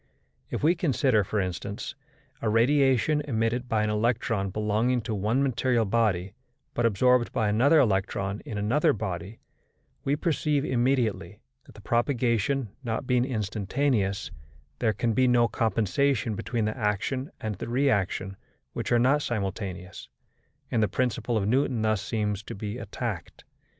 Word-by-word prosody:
If - - -4
we 160 +3 +5
consider, 135 - +2
for 105 +3 -2
instance, 95 +2 -4 0.5
a 115 - 0
radiation 135 +4 +3
emitted 120 0 -1
by 110 -1 +2
an 105 - 0
electron 110 -2 0
belonging 110 +5 0
to 110 - -4
one 110 +7 +1
material 125 -3 +1
body, 100 -4 +1 0.4
but 120 -1 +2
absorbed 125 +3 +3
by 110 - 0
another 130 +9 +4
electron 100 -3 0
in 105 - -7
another 110 +9 +2
body, 95 0 -5 0.6
we 140 - +1
perceive 150 -2 0
immediately 125 -4 0 0.3
that, - - -17
the - - -12
propagation 120 0 +1
not 115 +1 -2
being 125 -1 +2
instantaneous, 110 -2 -1 0.5
there 115 -3 +2
can 115 0 0
be 130 +3 +3
no 120 -1 +4
compensation 115 +2 +1
between 110 +1 -2
the 110 - -2
action 120 +5 -1
and 110 -1 -3
the - - -5
reaction, 100 -7 0 0.4
which - - -4
are 120 - +5
not 135 +5 +3
simultaneous; 95 -5 -4 0.6
and 115 - +2
the 105 - +3
principle 120 -1 -1
of 100 -2 0
Newton 125 -1 +1
thus 110 -3 +1
seems 105 -2 -2
to - - -8
be 105 +3 -5
attacked. 110 -4 -5
115 Hz, 145 wpm, -27 LUFS, 105-125 Hz, 0.6 s, we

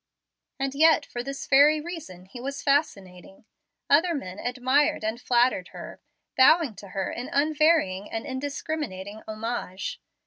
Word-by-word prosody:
And 270 0 -2
yet 315 0 +4
for 240 - -6
this 275 +2 -6
very 290 +3 +5
reason 300 - -8
he 240 +6 -11
was 275 +2 -5
fascinating. 195 - -2 0.4
Other 330 +4 +3
men 185 -9 -6
admired 255 +2 +1
and 220 +3 -3
flattered 245 +1 +2
her, - - -10 0.3
bowing 295 0 +5
to 200 - -10
her 190 0 -3
in 245 +2 -6
unvarying 295 - +2
and 225 - -5
indiscriminating 260 -7 -5
homage. 225 - -5
260 Hz, 135 wpm, -26 LUFS, 215-295 Hz, 0.4 s, very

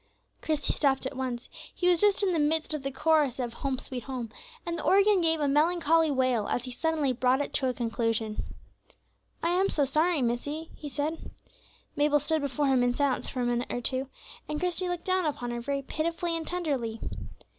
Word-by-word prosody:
Christie 305 -2 0
stopped 275 -2 +1
at 265 - -4
once; 255 -2 -3 0.3
he 360 - 0
was 355 -2 +4
just 415 0 +4
in 375 -2 +2
the 330 - +1
midst 310 +1 +1
of 305 - -2
the 275 - -2
chorus 300 -2 +2
of 240 -3 -3
"Home, 270 0 -2
sweet 250 -2 -6
Home," 250 -5 -5 0.3
and 340 - -2
the - - -5
organ 400 0 +5
gave 325 -1 +3
a 290 - +1
melancholy 325 +2 +3
wail 255 -6 +1
as 245 - -1
he 255 - -6
suddenly 305 -1 0
brought 255 +2 +2
it 285 - -3
to 265 - +2
a - - -1
conclusion. 225 -2 -1 1.0
"I 335 - +2
am 375 +2 +2
so 290 - +2
sorry, 310 +2 +2
missie," 290 +7 -2
he 295 - -7
said. 305 +3 -3 0.7
Mabel 295 0 +3
stood 315 +2 0
before 280 +1 -1
him 265 -2 +3
in 245 0 +2
silence 280 -2 0
for 255 - -3
a - - +1
minute 240 0 -1
or - - -1
two, 260 +2 -1 0.4
and 300 0 -2
Christie 360 0 -1
looked 355 -1 -4
down 370 -3 +1
upon 245 -5 -3
her 240 0 -3
very 275 +2 -2
pitifully 335 +4 -1
and 325 -1 -4
tenderly. 275 -11 -2
290 Hz, 205 wpm, -28 LUFS, 255-325 Hz, 1.0 s, organ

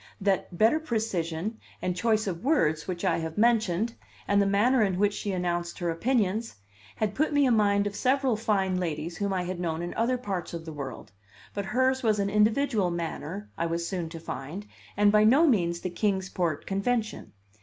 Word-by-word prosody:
That 190 -3 0
better 225 - +4
precision 215 - -2 0.2
and 180 - -2
choice 220 +1 +1
of 175 -4 -4
words 160 - +2
which 180 0 -3
I 170 -2 +2
have 160 -1 -5
mentioned, 225 -2 +2 0.3
and 200 0 +4
the 200 - +2
manner 225 +6 +3
in 195 -4 +1
which 205 +1 +2
she 205 - -3
announced 175 -2 -2
her 175 -2 -1
opinions, 220 +3 0 0.4
had 210 -2 -1
put 310 +6 +1
me 290 -1 +4
in 245 -3 +4
mind 200 -1 +3
of 205 0 -3
several 260 0 +2
fine 195 -4 0
ladles 165 -1 -3
whom 200 -1 -1
I 185 -2 0
had 180 0 -4
known 170 -1 -2
in 175 - -4
other 245 +3 +1
parts 195 -8 -4
of 165 -1 -7
the 160 - -7
world; 135 -7 -7 0.4
but 200 -1 -3
hers 260 +4 +1
was 220 -4 +2
an 200 0 0
individual 215 -1 +2
manner, 170 +3 -5
I 170 - +1
was 170 0 -2
soon 175 -3 -3
to 165 0 -8
find, 160 +6 -6 0.3
and 205 0 +5
by 210 0 +5
no 265 +10 +6
means 170 - +2
the 185 - -3
Kings 190 0 0
Port 170 -6 -2
convention. 215 +3 -2
200 Hz, 195 wpm, -27 LUFS, 175-220 Hz, 0.4 s, no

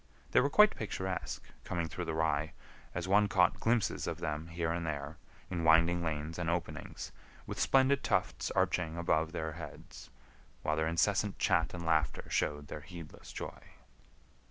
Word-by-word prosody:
They - - +6
were 140 - +3
quite 210 +7 +6
picturesque, 95 -4 -3 0.2
coming 85 -2 -2
through 90 +2 -5
the 80 -1 -2
rye, 80 -1 +1 0.4
as 85 +1 -2
one 105 +2 +5
caught 90 -2 +3
glimpses 115 -1 +1
of - - -2
them 75 +1 -3
here 85 0 -2
and 85 0 -1
there, 75 0 -4 0.3
in 85 -2 -1
winding 85 +2 +5
lanes 80 +1 -3
and 85 -1 -1
openings, 85 -1 -3 0.3
with - - -5
splendid 135 +1 +4
tufts - - 0
arching 85 -2 +1
above 80 -2 +1
their 80 -2 -3
heads, 80 0 -10 0.5
while 75 - +1
their 80 0 +1
incessant 95 +4 +1
chat 85 -4 +2
and 85 -1 -5
laughter 80 -3 +1
showed 75 0 0
their 75 - -7
heedless 85 0 -10
joy. - - -6
85 Hz, 160 wpm, -33 LUFS, 80-90 Hz, 0.5 s, They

